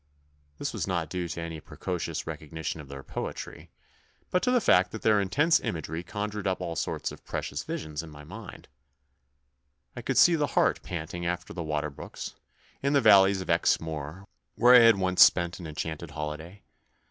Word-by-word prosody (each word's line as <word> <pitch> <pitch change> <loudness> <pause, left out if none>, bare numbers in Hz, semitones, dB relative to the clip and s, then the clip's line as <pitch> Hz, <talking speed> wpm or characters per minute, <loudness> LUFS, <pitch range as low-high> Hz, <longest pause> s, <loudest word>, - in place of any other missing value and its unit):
This - - -3
was - - -3
not 85 -4 -2
due 90 -2 -2
to 85 0 -5
any 85 -1 -5
precocious 85 0 -4
recognition 80 0 -5
of 70 - -13
their 70 0 -9
poetry, - - -6 0.6
but 180 - +2
to - - +1
the 250 0 +4
fact 90 - +4
that 110 - -8
their 105 -2 +4
intense 145 - +3
imagery 80 0 -4
conjured 105 +1 -4
up 95 - 0
all 85 -2 -4
sorts - - -2
of - - -12
precious - - -4
visions 75 -1 -4
in 80 - -10
my 75 -1 -12
mind, 75 - -10 1.3
I - - -6
could - - -2
see 175 - +7
the 150 -3 +1
hart - - +3
panting 85 0 -5
after 90 +2 -3
the 90 - -5
water 75 -1 -2
brooks, 70 - -8 0.5
in 140 +1 +1
the 140 - +5
valleys 95 -2 +6
of - - -8
Exmoor, 80 +1 0 0.3
where 125 +1 +6
I 125 - +11
had 115 -3 +7
once 95 -1 +2
spent 85 +1 +5
an 85 - -7
enchanted 80 +1 -5
holiday. 75 +5 -6
85 Hz, 180 wpm, -28 LUFS, 80-100 Hz, 1.3 s, I